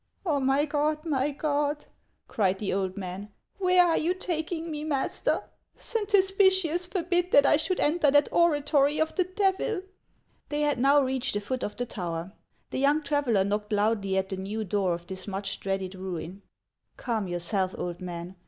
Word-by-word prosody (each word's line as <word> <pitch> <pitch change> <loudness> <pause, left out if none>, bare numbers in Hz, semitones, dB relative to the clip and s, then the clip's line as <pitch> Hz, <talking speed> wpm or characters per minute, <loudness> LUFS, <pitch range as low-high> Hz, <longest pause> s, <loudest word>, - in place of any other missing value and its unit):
" - - -42
Oh, 300 -5 +1
my 270 +2 +2
God! 305 +1 -1
my 285 -3 +1
God! 295 0 -1 0.2
" - - -46
cried 195 -3 +1
the 200 0 -2
old 190 0 -2
man, 190 +2 -6
" - - -46
where 365 -1 +5
are 335 -2 +2
you 345 +4 +1
taking 335 -2 -3
me, 300 -1 -4
master? 285 -4 0 0.3
Saint 440 -3 -3
Hospitius 380 -3 +3
forbid 355 -1 0
that 285 -5 +6
I - - +5
should 360 +4 -1
enter 305 -1 +3
that 290 +1 +4
oratory 295 -3 +3
of 315 0 +1
the 370 - +1
Devil! 380 +1 0 0.3
" - - -41
They 295 0 -1
had 295 -4 +1
now 280 +3 +5
reached 260 -3 -1
the - - +1
foot 255 +5 -4
of 210 - -4
the 245 - -1
tower. 175 -4 -5 0.4
The - - -2
young 290 +3 +3
traveller 280 -9 +1
knocked 210 +2 -2
loudly 205 -2 +1
at 190 0 -1
the 190 - -4
new 205 +4 -3
door 190 -3 0
of 170 0 -10
this 185 +1 -6
much 195 0 -4
dreaded 195 -1 -3
ruin. 185 0 -6 0.3
" - - -49
Calm 225 -5 -2
yourself, 180 +2 -1
old 175 +1 -5
man. 175 +1 -7
275 Hz, 190 wpm, -27 LUFS, 195-315 Hz, 0.4 s, that